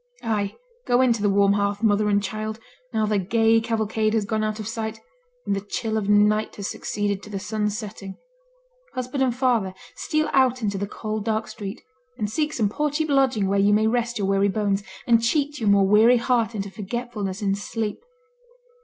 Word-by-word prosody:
Ay! 210 -3 -1 0.3
go 245 0 +3
in 255 -2 +4
to 225 - -4
the 205 - +2
warm 200 0 +4
hearth, 200 +1 -1
mother 210 -1 +3
and 200 0 +2
child, 215 +2 -4 0.3
now 220 -2 +1
the 210 -1 +1
gay 225 +3 +3
cavalcade 220 -1 0
has 215 -2 +1
gone 215 +1 -1
out 215 0 -2
of 215 - -5
sight, 225 -1 -4 0.5
and - - 0
the 195 - -2
chill 220 +2 -3
of 210 -2 -1
night 210 +1 +3
has 200 -1 -4
succeeded 205 -1 -2
to 210 - -11
the 200 - -4
sun's 210 +1 -2
setting. 205 -3 -7 0.8
Husband 255 +2 -3
and 255 -3 +2
father, 235 -7 +1 0.2
steal 310 0 0
out 255 -2 +3
into 200 -2 -1
the 200 - -2
cold 215 0 -4
dark 220 0 -1
street, 200 -1 -7 0.3
and 210 -1 -2
seek 300 +5 0
some 220 -8 +1
poor 300 +9 -1
cheap 310 +2 -1
lodging 265 -7 +3
where 200 +1 +1
you 200 +1 +4
may 215 +1 +3
rest 235 +1 0
your 200 - -1
weary 195 +1 +2
bones, 205 -1 0 0.2
and 230 -1 +4
cheat 290 +5 0
your 215 -3 +1
more 200 -1 +5
weary 220 +5 +6
heart 235 -2 +1
into 200 -1 -4
forgetfulness 210 -2 -4
in 195 -1 +2
sleep. 210 - -4
215 Hz, 200 wpm, -24 LUFS, 200-235 Hz, 0.8 s, weary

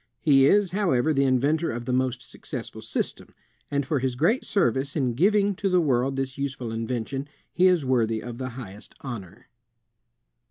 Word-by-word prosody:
He 135 -3 +5
is, 205 -1 +3
however, 160 -7 +1
the 140 -1 +2
inventor 145 +6 +2
of 120 0 -5
the 125 - -1
most 125 -1 0
successful - - -7
system; - - -4 0.3
and 140 -1 -1
for 145 +1 0
his 130 -1 -1
great 175 - +1
service 135 - 0
in 130 -6 0
giving 200 - +3
to 195 - 0
the 180 -1 +4
world 135 -4 +1
this 135 0 -3
useful 135 -4 -3
invention, 120 +4 -3 0.3
he 185 +1 +4
is 180 -6 +3
worthy 115 -4 +1
of 120 +1 -8
the 130 -1 -3
highest 105 -5 -10
honor. 105 -9 -8
135 Hz, 170 wpm, -25 LUFS, 120-160 Hz, 0.3 s, He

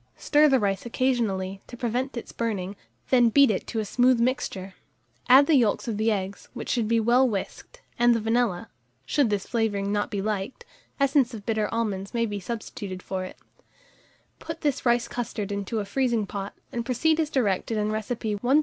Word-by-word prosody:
Stir 300 0 +4
the 265 -2 +4
rice 195 -3 0
occasionally, 220 -7 -1
to 245 - -10
prevent 245 +3 -2
its 235 - -6
burning, 205 -4 -3 0.4
then 245 -2 +5
beat 275 +1 +5
it 190 - -3
to 230 - -5
a 215 - -1
smooth 250 +3 +3
mixture; 230 -6 -1 0.6
add 265 +3 +8
the 320 - +2
yolks 240 -7 +2
of 220 -3 -2
the 220 +1 +2
eggs, 195 -1 -4
which - - -6
should 235 -4 +1
be 230 +1 +3
well 245 +3 +4
whisked, 225 - -6 0.2
and 240 0 +5
the - - +1
vanilla 225 -4 0 0.4
(should 285 -6 +2
this 205 -2 -1
flavouring 205 -4 -1
not 205 0 0
be 205 -4 -3
liked, 210 - -3 0.3
essence 275 -3 +2
of 205 -2 -9
bitter 220 -2 0
almonds 210 -3 -2
may 230 0 +2
be 205 -2 -4
substituted 200 -3 -6
for 185 -1 -3
it); - - -10 1.0
put 325 0 -7
this 285 -4 0
rice 240 0 +3
custard 220 -4 -4
into 200 +2 -3
the 210 -2 -1
freezing 235 -2 0
pot, 200 +1 -6 0.2
and 235 - -3
proceed 305 +6 +1
as 310 -2 +1
directed 225 -5 0
in 210 0 0
recipe 215 -1 -3
No. 265 +5 +4
230 Hz, 190 wpm, -26 LUFS, 205-250 Hz, 1.0 s, add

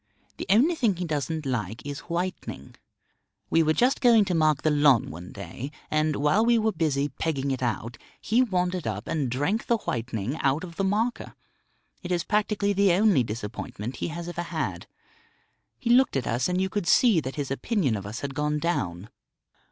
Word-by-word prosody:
The - - -6
only 250 - +5
thing 235 - +1
he 180 +1 -3
doesn't 155 0 -2
like 115 -4 -3
is 145 -1 -5
whitening. 170 - -4 0.8
We 165 - +4
were 155 0 +2
just 255 +3 +2
going 230 -5 +6
to 185 - -1
mark 155 -3 +2
the 155 - +3
lawn 145 -5 +4
one 90 +3 -9
day, 115 +7 -7 0.2
and 155 0 +1
while 150 +10 +2
we 235 0 +4
were 220 0 +2
busy 145 -6 0
pegging 140 0 -2
it 130 - -3
out 120 -1 -3 0.2
he 230 +4 +2
wandered 180 - 0
up 105 -1 -4
and 145 -6 -1
drank 145 - -1
the 235 - +3
whitening 120 - -3
out 140 +4 +1
of 170 -2 -9
the 195 - 0
marker. 215 +5 -1 0.7
It 180 - -6
is 175 -1 +1
practically 210 -1 0
the 200 -2 +4
only 195 -6 +4
disappointment 115 +2 -6
he - - -2
has 170 +1 -6
ever 175 0 -4
had. 175 - -4 0.9
He 235 -3 -1
looked 260 - +4
at 130 - -2
us, 125 +7 0
and 180 0 0
you 190 - +1
could 190 -2 -3
see 225 -3 +5
that 135 -3 -5
his 140 -3 -3
opinion 140 - 0
of 100 -1 -5
us 110 +5 -6
had 140 -1 -4
gone 150 +2 0
down. 100 - -2
155 Hz, 190 wpm, -26 LUFS, 130-195 Hz, 0.9 s, going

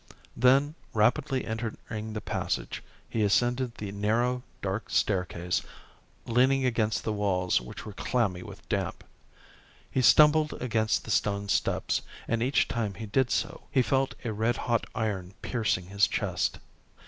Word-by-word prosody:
Then, 135 +4 +4 0.2
rapidly 125 +4 +2
entering 110 -1 -5
the 105 - -4
passage, - - -3 0.3
he 115 - -2
ascended 120 +4 +2
the 100 -2 -5
narrow, 115 +5 +1 0.2
dark 95 +2 -2
staircase, 90 -3 0 0.6
leaning 130 +3 +3
against 115 -3 +1
the 110 - -1
walls 95 -6 +1
which 60 - -9
were 105 - -7
clammy 100 -5 0
with - - -11
damp. - - -2 0.9
He 130 - +1
stumbled 150 +5 +6
against 110 -3 0
the - - -4
stone 100 -1 0
steps, - - +1 0.3
and 115 -1 0
each 130 +4 +2
time 110 -5 -2
he 115 - -6
did 125 +4 +1
so, - - -1
he 130 - +3
felt 135 +1 +1
a 115 - -1
red 115 +3 +1
hot 120 -2 0
iron 100 -5 -2
piercing 110 -7 0
his 100 +1 +3
chest. - - -1
110 Hz, 145 wpm, -28 LUFS, 100-125 Hz, 0.9 s, stumbled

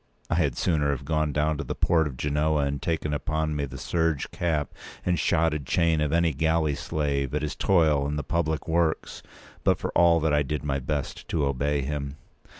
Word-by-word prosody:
I - - +3
had - - +1
sooner 75 -5 +1
have 70 -3 -2
gone 75 -1 0
down 75 +1 0
to - - -2
the 65 - -4
port 80 -2 +2
of 65 -3 -8
Genoa 75 +1 +1
and 70 0 -2
taken 80 -2 -1
upon 80 +1 -1
me 70 -1 -1
the 70 0 -9
serge 80 -3 -1
cap 80 -5 -1 0.3
and 90 -2 +1
shotted 75 -4 +1
chain 85 -1 +2
p. 75 - +2
207of 70 - -2
any 85 -1 +3
galley 80 +1 +1
slave 70 -1 -2
at 75 - -1
his 75 - -3
toil 80 -7 +3
in 75 - -2
the 75 - -2
public 80 0 -1
works; 80 -1 0 0.4
but - - +3
for - - -4
all 85 -1 +5
that 80 -1 +1
I 75 - +4
did 75 +2 -3
my 70 -1 -1
best 70 +2 -4
to 75 -4 0
obey 70 +1 0
him. 70 0 -4
75 Hz, 210 wpm, -26 LUFS, 70-80 Hz, 0.4 s, all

